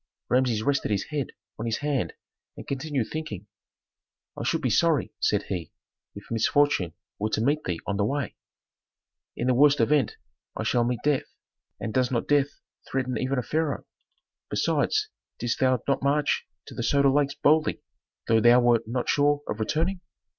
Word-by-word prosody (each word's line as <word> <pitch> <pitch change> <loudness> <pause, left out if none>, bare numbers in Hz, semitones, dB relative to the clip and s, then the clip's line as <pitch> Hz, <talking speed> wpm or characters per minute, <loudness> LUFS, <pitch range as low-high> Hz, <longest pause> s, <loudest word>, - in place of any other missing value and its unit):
Rameses 125 -4 +2
rested 140 -1 +1
his 100 -2 0
head 145 -4 -2 0.3
on 115 - -3
his 115 0 0
hand 145 -4 -1 0.4
and - - -8
continued 140 -3 -2
thinking. 110 - -5 0.9
"I - - -6
should - - 0
be - - +1
sorry," - - +2
said - - +1
he, 90 -5 -5 0.4
"if 100 - -9
misfortune 115 - +2 0.3
were 105 +1 0
to 110 - 0
meet 145 +5 +1
thee 85 -2 -2
on 100 - -2
the 100 - +2
way." 140 +1 -2 1.0
"In 120 - -2
the 130 - +3
worst 145 +3 +5
event 130 +1 +2 0.4
I - - -2
shall 120 - +2
meet 120 -1 -2
death, 145 -2 +1 0.5
and 110 - -4
does 130 -1 +2
not 120 -3 -1
death 145 -1 +3 0.4
threaten 130 -1 -1
even 130 +4 -1
a 125 - 0
pharaoh. 155 0 -1 0.6
Besides, 425 0 +1 0.3
didst 120 -1 -2
thou 130 -2 +3
not 140 - +1
march 145 +2 +1 0.2
to - - -11
the - - -4
Soda 140 +3 +3
Lakes 140 0 +1
boldly, 155 +1 +2 0.4
though 115 0 +4
thou 120 +2 +7
wert 120 -2 +3
not 120 +2 -2
sure 145 0 +2
of 105 - -3
returning? 165 - 0
130 Hz, 170 wpm, -26 LUFS, 115-145 Hz, 1.0 s, thou